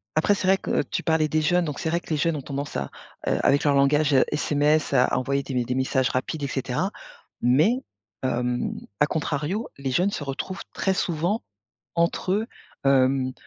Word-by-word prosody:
après 160 +6 +3
c'est 200 -2 -2
vrai 190 +1 +5
que - - 0
tu - - -4
parlais 160 -2 +2
des 155 +1 +1
jeunes, 175 +3 +3
donc 150 -2 -4
c'est 160 - -1
vrai 170 +1 +1
que - - -16
les 155 - +1
jeunes 165 +2 +1
ont - - -5
tendance 140 +1 -5
à, 70 -1 -2 0.4
heu, - - +2
avec 140 - +4
leur 145 -2 +3
langage, 145 +2 +3
heu, 130 - +6
SMS, 150 0 +1
à 125 -1 +3
envoyer 140 +1 0
des 135 - -6
me 125 - +1
des 125 +1 -2
messages 130 0 +1
rapides 145 +4 -2
et - - 0
cetera. 135 +8 -2 0.5
Mais, 150 - +4 0.5
hem, 125 -1 -1 0.3
a 150 - +5
contrario, 155 - -2
les 135 -1 -3
jeunes 180 +9 +2
se 150 - -4
retrouvent 145 +7 -5
très 190 - 0
souvent 175 +7 0 0.5
entre 170 +2 +1
eux, 215 +3 +1 0.4
hem, 130 -1 +3
145 Hz, 200 wpm, -25 LUFS, 135-170 Hz, 0.5 s, heu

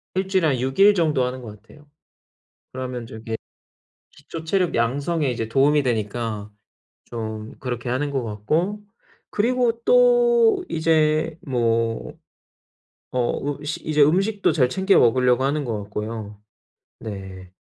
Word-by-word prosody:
1 190 0 0
주일에 190 -4 +2
한 140 - +2
6 130 +4 -3
일 205 +1 +7
정도 155 -7 +2
하는 125 +1 -3
것 105 -4 -10
같아요. 145 +7 -19 0.8
그러면 125 -2 -5
저기 110 0 -6 0.8
기초 160 +3 -9
체력 180 +1 0
양성에 140 +6 0
이제 115 -2 -3
도움이 145 +5 +3
되니까 110 -2 -2 0.5
좀 110 -2 -6
그렇게 125 -2 -4
하는 130 +4 -1
것 135 -4 -2
같고 155 - -1 0.5
그리고 235 +1 +1
또 480 -5 +4
이제 155 0 +1
뭐 115 -3 0 1.0
뭐 135 +3 -1
으 - - -10
식 160 - -5
이제 150 -1 +2
음식도 195 +8 +3
잘 130 -6 +2
챙겨 190 +5 +3
먹으려고 125 +1 +3
하는 145 +1 0
것 110 -3 -3
같고요. 105 0 -6 0.6
네. 95 -3 -8
135 Hz, 240 characters per minute, -23 LUFS, 115-165 Hz, 1.0 s, 일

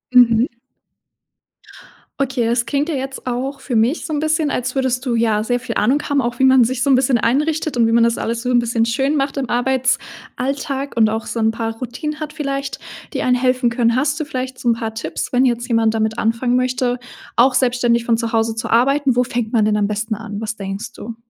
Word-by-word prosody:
Mhm. 235 -1 +6 1.7
Okay, 260 -3 0
das 235 +1 0
klingt 290 +2 0
ja 315 - -1
jetzt 270 0 -5
auch 255 +3 -3
für 250 - -4
mich 235 +8 +1
so 315 - -4
'n 295 - 0
bisschen, 310 -1 0
als 250 +1 -2
würdest 260 -2 0
du, 245 -2 0
ja, 220 -2 +1
sehr 245 +2 0
viel 255 - -5
Ahnung 255 +8 +2
haben, 285 -1 +1
auch 240 0 -3
wie - - +1
man 260 -1 +6
sich 250 +1 -1
so - - +1
'n 265 - +6
bisschen 255 -1 +3
einrichtet 300 +6 0
und 230 -2 +3
wie - - +1
man 230 0 +4
das 235 0 +1
alles 230 +1 -2
so 250 - -1
'n 245 - +4
bisschen 230 -1 +1
schön 270 +6 0
macht 275 -1 -1
im 260 -5 -2
Arbeitsalltag 265 +2 -2
und 220 -2 +4
auch 220 +1 -3
so 230 - -4
'n 220 0 +3
paar 225 0 -3
Routinen 295 +5 -5
hat 305 -1 -5
vielleicht, 275 -3 -4 0.3
die - - -2
einen 250 0 +3
helfen 255 -1 +1
können. 235 0 +2
Hast 285 +4 0
du 310 - -2
vielleicht 255 -2 -5
so 240 - 0
'n - - +5
paar 225 -1 -4
Tipps, 225 +3 -5
wenn 250 - +4
jetzt 240 -2 0
jemand 225 -2 +2
damit 220 0 -1
anfangen 230 +2 +1
möchte, 250 -1 0 0.4
auch 250 +2 +4
selbstständig 245 -2 +2
von 235 - +3
zu 230 0 -3
Hause 225 0 +1
zu 225 - -4
arbeiten? 270 +2 +3
Wo 250 - +3
fängt 240 -3 -3
man 220 -4 +3
denn 210 0 +2
am 205 -1 +1
besten 215 +1 -2
an? 210 -1 -6
Was 220 0 -4
denkst 195 +3 -6
du? 230 +1 -8
245 Hz, 230 wpm, -19 LUFS, 230-265 Hz, 1.7 s, Mhm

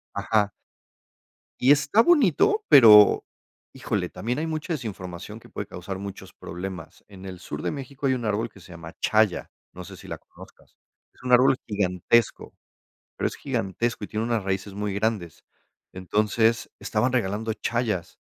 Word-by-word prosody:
Ajá. 105 -2 +1 1.1
Y 130 - +4
está 150 +10 +4
bonito, 345 - +3
pero, 105 -5 +8 0.5
híjole, - - -3
también 125 +4 -4
hay 160 - -2
mucha 160 +2 -3
desinformación 105 - -6
que - - -17
puede 100 - -6
causar 95 0 -7
muchos 100 0 -8
problemas. 90 -2 -8
En 95 -1 -12
el 95 -1 -8
sur 75 -4 -7
de - - -1
México 140 -1 -6
hay 130 - +3
un 120 -2 -4
árbol 110 +2 -1
que 100 - -17
se 90 - -14
llama 85 -1 -10
Chaya, 110 -3 +1 0.2
no - - -9
sé - - -11
si - - -13
la - - -5
conozcas, - - -17 0.4
es - - -23
un 125 0 -2
árbol 130 +2 +6
gigantesco, 100 +2 0 0.6
pero - - 0
es - - -9
gigantesco 105 +4 -2
y - - -5
tiene 110 +1 -2
unas 115 -2 -1
raíces 95 +1 -3
muy 105 0 -3
grandes, 100 -5 -2 0.5
entonces, 105 +5 0
estaban 120 +4 -1
regalando 110 -2 -1
C 105 - -11
hayas. 115 -7 -2
105 Hz, 165 wpm, -25 LUFS, 95-125 Hz, 1.1 s, pero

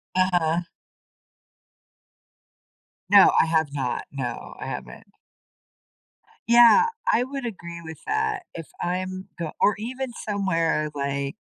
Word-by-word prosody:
Uh-huh. 175 -2 +2 2.5
No, - - +8
I - - +5
have 160 -3 +1
not. 130 -4 -2
No, 130 -4 -5
I - - -6
haven't. - - -7 1.4
Yeah, 240 - +7 0.2
I 450 - +3
would 270 -1 -6
agree 170 -6 -7
with 160 -1 -9
that. 430 -2 0
If 165 -2 -8
I'm 185 +2 -3
go 165 -2 -4
or 210 - +4
even 255 +3 -5 0.2
somewhere 165 -6 0
like 140 +2 -2
180 Hz, 110 wpm, -24 LUFS, 160-235 Hz, 2.5 s, No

